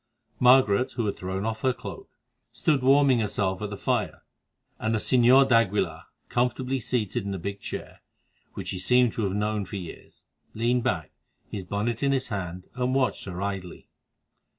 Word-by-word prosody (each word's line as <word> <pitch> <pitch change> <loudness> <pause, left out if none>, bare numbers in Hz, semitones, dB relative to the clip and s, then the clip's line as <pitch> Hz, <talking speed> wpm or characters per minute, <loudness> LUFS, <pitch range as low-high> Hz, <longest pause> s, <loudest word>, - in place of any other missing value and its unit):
Margaret, 125 -3 +5
who 120 -2 -1
had 100 - -1
thrown 95 +2 -4
off 110 0 -3
her 130 -1 +2
cloak, - - -9 0.4
stood 145 -4 +1
warming 135 -1 +5
herself 95 -3 -1
at 105 - -3
the 100 - -6
fire, - - -1 0.6
and 110 0 0
the - - +2
Señor 130 +4 +5
d'Aguilar, 100 -9 +1 0.2
comfortably 125 +2 0
seated 120 -1 -1
in 100 0 -3
a - - -3
big 100 +3 -5
chair, - - -7 0.5
which - - -5
he 95 - -4
seemed 125 +4 +3
to 115 - -2
have 95 - -1
known 105 0 0
for 95 - -8
years, 90 -4 -9 0.3
leaned 120 +2 +1
back, 80 -7 -1 0.4
his 95 -3 -5
bonnet 105 +5 -2
in 140 -1 +2
his 130 -2 -1
hand, 90 -3 -4
and 125 +1 -1
watched 135 -2 0
her 95 0 -5
idly. 95 -3 -5
110 Hz, 175 wpm, -26 LUFS, 100-125 Hz, 0.6 s, Margaret